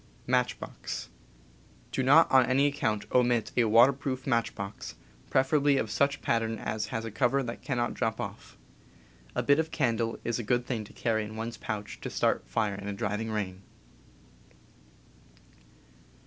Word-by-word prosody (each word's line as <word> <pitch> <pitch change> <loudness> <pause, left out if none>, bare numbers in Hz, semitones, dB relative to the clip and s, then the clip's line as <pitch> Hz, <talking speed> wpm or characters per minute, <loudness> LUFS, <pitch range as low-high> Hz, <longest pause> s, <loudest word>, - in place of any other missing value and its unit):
Do - - -1
not 145 +6 +6
on 130 -2 +6
any 135 +2 +3
account 110 -8 0
omit 120 -3 +2
a 120 - +4
water 115 +5 +6
'proof 130 -1 -4
matchbox, 115 -5 -2 0.3
preferably 140 +1 +3
of 110 -4 -1
such 140 +1 +1
pattern 115 -1 0
as 105 -1 -3
has 115 -2 -4
a 115 - -5
cover 135 +4 +1
that 120 -1 -6
cannot 120 -3 -1
^,, - - -6
drop 115 -3 -1
off. - - -7 0.8
A - - 0
bit 140 +2 +4
of 160 0 0
candle 115 -7 0
is 120 0 -1
a - - -3
good 120 +3 +1
thing 115 -4 -2
to - - -15
carry 110 -2 0
in 105 +1 -8
one's 115 +1 -5
pouch 105 -1 -5
to - - -4
start - - 0
fire 110 -3 0
in 100 0 -7
a 100 - -2
driving 105 +2 -2
rain. 100 -3 -3
115 Hz, 160 wpm, -29 LUFS, 110-130 Hz, 0.8 s, not